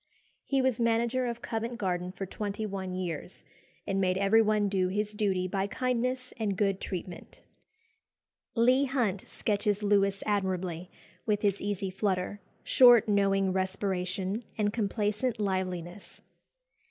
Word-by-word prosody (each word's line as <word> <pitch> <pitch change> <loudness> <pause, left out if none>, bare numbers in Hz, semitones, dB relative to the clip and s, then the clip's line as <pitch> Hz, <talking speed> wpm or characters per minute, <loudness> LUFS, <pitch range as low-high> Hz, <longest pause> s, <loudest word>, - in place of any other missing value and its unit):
He 270 -2 +1
was 260 -3 +1
manager 235 +2 +1
of 235 0 -5
Covent 230 +1 -3
Garden 180 -4 -2
for 195 - -5
twenty 205 +2 -4
one 190 -2 -4
years, 180 -1 -5 0.4
and 195 -1 0
made 185 -1 +2
everyone 210 +1 +3
do 190 -2 +1
his 210 +3 -1
duty 195 -3 0
by 195 +1 -1
kindness 255 +2 -1
and 205 -4 -1
good 195 -2 +1
treatment. 180 -1 -7 1.1
Leigh 255 +4 +4
Hunt 235 -8 0
sketches 210 -1 -1
Lewis 200 -1 +2
admirably, 185 -4 -1 0.4
with 210 -1 +1
his 200 -1 +1
"easy 200 -1 -2
flutter," 190 0 -1 0.2
short 245 -4 +7
knowing 195 -2 +2
respiration, 190 +2 -2
and 205 -1 +1
complacent 215 +2 -1
liveliness. 185 -2 -3
200 Hz, 130 wpm, -29 LUFS, 190-225 Hz, 1.1 s, short